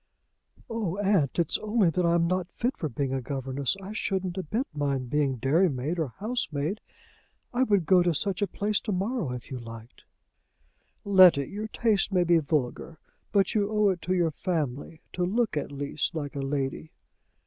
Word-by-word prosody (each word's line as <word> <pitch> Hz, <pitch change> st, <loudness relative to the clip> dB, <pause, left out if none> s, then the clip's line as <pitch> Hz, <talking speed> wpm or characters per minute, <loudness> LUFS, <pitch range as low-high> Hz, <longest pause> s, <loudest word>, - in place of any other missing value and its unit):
"O 215 Hz, -6 st, -2 dB
aunt! 195 Hz, -9 st, +1 dB
it's 170 Hz, -3 st, +1 dB
only 215 Hz, -5 st, +2 dB
that 180 Hz, +2 st, 0 dB
I'm 170 Hz, 0 st, +3 dB
not 180 Hz, 0 st, -1 dB
fit 245 Hz, +3 st, -1 dB
for 155 Hz, -, -3 dB
being 135 Hz, +2 st, -2 dB
a 135 Hz, -, -1 dB
governess. 135 Hz, +3 st, -2 dB
I 195 Hz, +2 st, -8 dB
shouldn't 190 Hz, -4 st, -2 dB
a 190 Hz, -, -2 dB
bit 220 Hz, -, -2 dB
mind 140 Hz, -4 st, -2 dB
being 145 Hz, -3 st, +1 dB
dairymaid 150 Hz, +3 st, +1 dB
or 145 Hz, -7 st, -3 dB
housemaid. 200 Hz, -, -2 dB, 0.7 s
I 245 Hz, -, +1 dB
would 205 Hz, -9 st, +3 dB
go 180 Hz, +3 st, +5 dB
to 175 Hz, -2 st, +1 dB
such 195 Hz, +5 st, -1 dB
a 205 Hz, -, +2 dB
place 210 Hz, +1 st, 0 dB
to 215 Hz, -, -4 dB
morrow, 195 Hz, -, -1 dB
if 125 Hz, +2 st, -7 dB
you 130 Hz, -, -4 dB
liked." 115 Hz, 0 st, -11 dB, 1.0 s
"Letty, 185 Hz, -8 st, +7 dB
your 210 Hz, +2 st, -4 dB
tastes 215 Hz, -2 st, +1 dB
may 180 Hz, -2 st, +3 dB
be 170 Hz, -1 st, +4 dB
vulgar, 150 Hz, +1 st, -2 dB, 0.3 s
but 200 Hz, -1 st, +2 dB
you 205 Hz, -2 st, +1 dB
owe 210 Hz, -1 st, +3 dB
it 180 Hz, -3 st, -1 dB
to 185 Hz, +3 st, 0 dB
your 170 Hz, -3 st, +2 dB
family 155 Hz, -2 st, -3 dB
to 180 Hz, -, -1 dB
look 215 Hz, +2 st, 0 dB
at 145 Hz, -, -2 dB
least 145 Hz, +4 st, -2 dB
like 145 Hz, -3 st, -4 dB
a -, -, -3 dB
lady." 135 Hz, +2 st, -2 dB
175 Hz, 180 wpm, -27 LUFS, 140-200 Hz, 1.0 s, Letty